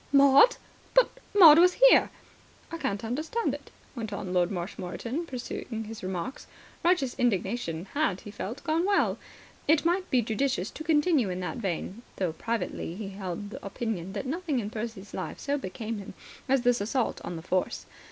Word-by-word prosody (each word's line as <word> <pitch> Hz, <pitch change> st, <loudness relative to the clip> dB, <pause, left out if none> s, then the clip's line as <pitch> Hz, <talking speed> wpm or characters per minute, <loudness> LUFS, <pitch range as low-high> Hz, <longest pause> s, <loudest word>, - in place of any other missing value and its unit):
"Maud? 280 Hz, -, +7 dB, 0.4 s
But -, -, +6 dB, 0.3 s
Maud 325 Hz, -5 st, +10 dB
was 360 Hz, +1 st, +6 dB
here." -, -, +6 dB, 0.6 s
"I 330 Hz, -, -5 dB
can't 200 Hz, -6 st, -2 dB
understand 310 Hz, -, -1 dB
it," -, -, -8 dB, 0.3 s
went 225 Hz, -3 st, -5 dB
on 195 Hz, -2 st, -4 dB
Lord 180 Hz, -1 st, +3 dB
Marshmoreton, 200 Hz, -, -4 dB
pursuing 240 Hz, -3 st, -5 dB
his 225 Hz, 0 st, -8 dB
remarks. 185 Hz, +6 st, -5 dB, 0.4 s
Righteous 340 Hz, -8 st, +2 dB
indignation 195 Hz, -6 st, 0 dB
had, 285 Hz, -11 st, 0 dB
he 205 Hz, -, -9 dB
felt, 215 Hz, +4 st, -6 dB
gone 325 Hz, +1 st, +1 dB
well. 400 Hz, +1 st, +2 dB, 0.5 s
It 310 Hz, +1 st, +4 dB
might 365 Hz, +2 st, +1 dB
be 250 Hz, -2 st, +3 dB
judicious 220 Hz, -3 st, -1 dB
to 315 Hz, -, -8 dB
continue 300 Hz, -, +3 dB
in 180 Hz, 0 st, -3 dB
that 180 Hz, +8 st, -4 dB
vein, 195 Hz, 0 st, -3 dB
though 180 Hz, -4 st, -1 dB
privately 195 Hz, -5 st, -3 dB
he 205 Hz, 0 st, -5 dB
held 195 Hz, +1 st, -6 dB
the -, -, -8 dB
opinion 195 Hz, -3 st, -4 dB
that 205 Hz, -, -4 dB
nothing 315 Hz, +1 st, -2 dB
in 210 Hz, -3 st, -2 dB
Percy's 220 Hz, -3 st, -6 dB
life 185 Hz, -, -4 dB
so 285 Hz, -, -1 dB
became 220 Hz, 0 st, -5 dB
him 195 Hz, -1 st, -9 dB, 0.3 s
as 265 Hz, -2 st, +3 dB
this 245 Hz, -2 st, +3 dB
assault 230 Hz, +4 st, -1 dB
on 175 Hz, -, -5 dB
the 160 Hz, -, -7 dB
Force. 185 Hz, +1 st, -1 dB
230 Hz, 170 wpm, -28 LUFS, 190-290 Hz, 0.6 s, Maud